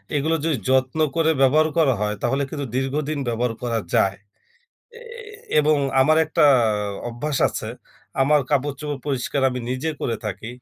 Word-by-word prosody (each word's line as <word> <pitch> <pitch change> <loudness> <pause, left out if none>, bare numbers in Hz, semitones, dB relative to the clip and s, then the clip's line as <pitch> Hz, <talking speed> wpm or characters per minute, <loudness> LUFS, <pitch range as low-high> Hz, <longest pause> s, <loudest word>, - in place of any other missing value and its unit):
এগুলো 155 +3 +1
যদি 155 -5 +1
যত্ন 130 +3 +1 0.2
করে 160 -1 +2
ব্যবহার 155 +4 +4
করা 145 -6 +4
হয় 105 0 0
তাহলে 135 +4 0
কিন্তু 145 -2 -4
দীর্ঘদিন 145 +3 -1
ব্যবহার 120 0 -1
করা 115 -2 0
যায় 95 0 +3 0.8
এ - - -14 0.6
এবং 150 0 +4 0.2
আমার 155 +4 +4
একটা 155 - 0 0.7
অভ্যাস 130 +5 -3
আছে - - -5 0.5
আমার 150 +2 +4
কাপড় 145 0 +1
চোপড় 150 -2 -4
পরিষ্কার 140 0 -1
আমি 125 - -4
নিজে 130 +5 -2
করে 115 -2 -1
থাকি 105 +2 -5
140 Hz, 155 wpm, -22 LUFS, 125-150 Hz, 0.8 s, ব্যবহার